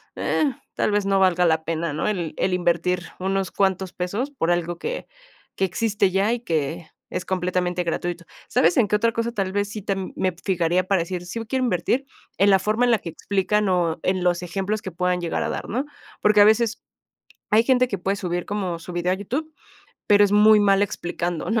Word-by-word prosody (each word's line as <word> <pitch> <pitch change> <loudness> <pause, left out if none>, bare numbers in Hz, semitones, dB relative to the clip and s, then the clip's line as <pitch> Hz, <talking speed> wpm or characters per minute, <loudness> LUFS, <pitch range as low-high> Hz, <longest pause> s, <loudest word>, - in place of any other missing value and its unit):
eh, - - 0 0.3
tal - - +1
vez 205 -1 +1
no 195 0 +2
valga 180 -2 +3
la 160 -1 +2
pena, 165 0 -2
¿no? 150 - -2
El 180 -7 -2
el 185 - 0
invertir 175 0 +1 0.2
unos 195 0 -1
cuantos 190 -1 0
pesos, 205 +10 -3
por 215 -12 -2
algo 175 0 -1
que - - -4 0.5
que 195 - +1
existe 200 +1 +1
ya, 195 +4 +2
y 240 - -2
que 160 - -2 0.2
es - - -4
completamente 180 -1 -1
gratuito, 175 0 -3 0.3
¿sabes 170 +2 +3
en 230 - +4
qué 210 - +1
otra 230 +2 +2
cosa 230 0 -1
tal 195 -4 -1
vez 205 0 0
sí 210 +1 -6
tam 195 -2 -3
me 185 -1 0
fijaría 180 -1 +1
para 195 -2 +2
decir, 180 +1 -4
sí 185 +6 -5
b 225 - -5
quiero 260 +3 0
invertir? 240 +6 0 0.3
En 200 +2 +4
la 195 - +5
forma 215 +5 +1
en 245 - +3
la 225 - +3
que - - -7
explican 200 +4 0
o 175 -3 +1
en 185 -1 0
los 175 -1 +1
ejemplos 195 +4 -2
que 190 - -6
puedan 180 +1 0
llegar 170 - -1
a - - -2
dar, - - -4
¿no? 255 +6 -1 0.4
Porque, 210 0 +4
a - - +8
veces 220 +1 +2 0.7
hay 215 +2 +5
gente 255 0 +3
que 200 - -3
puede 195 +3 -1
subir 175 -3 -3
como 190 -5 -3
su 180 - -9
video 175 +1 0
a - - 0
YouTube, 270 +11 -4 0.6
pero 205 0 +6
es 200 - 0
muy 210 +1 +7
mal 200 -1 +4
explicando, 175 -3 -3
¿no? 225 0 +2
190 Hz, 215 wpm, -23 LUFS, 175-210 Hz, 0.7 s, a